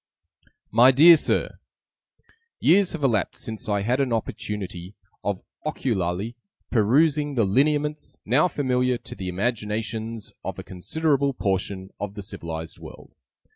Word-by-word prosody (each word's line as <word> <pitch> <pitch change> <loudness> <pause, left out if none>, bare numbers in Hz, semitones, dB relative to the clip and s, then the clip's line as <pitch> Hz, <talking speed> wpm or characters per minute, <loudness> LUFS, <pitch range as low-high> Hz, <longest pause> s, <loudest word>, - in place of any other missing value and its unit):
'My 120 +4 +7
Dear 155 +6 +9
Sir, 155 - -1 1.0
'Years 190 +3 +4
have 160 -4 -5
elapsed, 115 -8 0
since 110 -1 -5
I 100 -1 +1
had 125 +5 +1
an 135 -3 0
opportunity 105 -4 -4 0.3
of 100 -2 -2 0.2
ocularly 110 - -2 0.4
perusing 145 +6 +3
the 115 -4 +3
lineaments, 150 +7 0
now 135 - +4
familiar 125 -5 0
to - - -10
the 95 -1 -5
imaginations 110 +2 -3
of - - -5
a - - -6
considerable 140 - 0
portion 95 -2 -2
of 100 0 -5
the 100 - -6
civilized 80 -3 -6
world. - - -12
115 Hz, 130 wpm, -24 LUFS, 100-140 Hz, 1.0 s, Dear